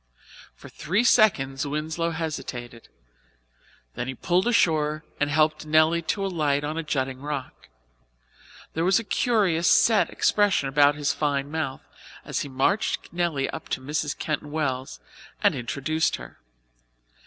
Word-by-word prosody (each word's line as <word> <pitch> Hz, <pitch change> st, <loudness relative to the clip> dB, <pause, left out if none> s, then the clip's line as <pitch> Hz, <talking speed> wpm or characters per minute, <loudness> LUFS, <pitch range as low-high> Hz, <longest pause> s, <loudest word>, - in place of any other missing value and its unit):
For -, -, -13 dB
three 185 Hz, +9 st, -1 dB
seconds 145 Hz, -, +3 dB
Winslow 155 Hz, +3 st, -2 dB
hesitated. 130 Hz, -8 st, -6 dB, 1.1 s
Then 125 Hz, -, -4 dB
he 130 Hz, -, -4 dB
pulled 180 Hz, -, +1 dB
ashore 155 Hz, -9 st, +2 dB, 0.2 s
and 145 Hz, -, +1 dB
helped 155 Hz, +1 st, +2 dB
Nelly 155 Hz, +2 st, +4 dB
to 195 Hz, +4 st, -2 dB
alight 150 Hz, -6 st, 0 dB
on 150 Hz, +1 st, -3 dB
a 165 Hz, -, -2 dB
jutting 135 Hz, -4 st, -2 dB
rock. 145 Hz, -, -6 dB, 1.0 s
There 165 Hz, -, -1 dB
was 190 Hz, +2 st, +4 dB
a 230 Hz, -, -1 dB
curious, 200 Hz, -8 st, +1 dB
set 220 Hz, -3 st, +4 dB
expression 205 Hz, -9 st, +2 dB
about 145 Hz, +1 st, +4 dB
his 145 Hz, -1 st, 0 dB
fine 145 Hz, -1 st, -1 dB
mouth 145 Hz, -4 st, -3 dB, 0.4 s
as -, -, -2 dB
he 140 Hz, -, -4 dB
marched 135 Hz, +13 st, 0 dB
Nelly 170 Hz, -6 st, 0 dB
up -, -, -8 dB
to -, -, -1 dB
Mrs. 145 Hz, +2 st, -3 dB
Keyton 150 Hz, -2 st, -3 dB
Wells 135 Hz, -4 st, -3 dB, 0.4 s
and -, -, +5 dB
introduced 145 Hz, +6 st, -1 dB
her. -, -, -11 dB
155 Hz, 140 wpm, -25 LUFS, 140-170 Hz, 1.1 s, and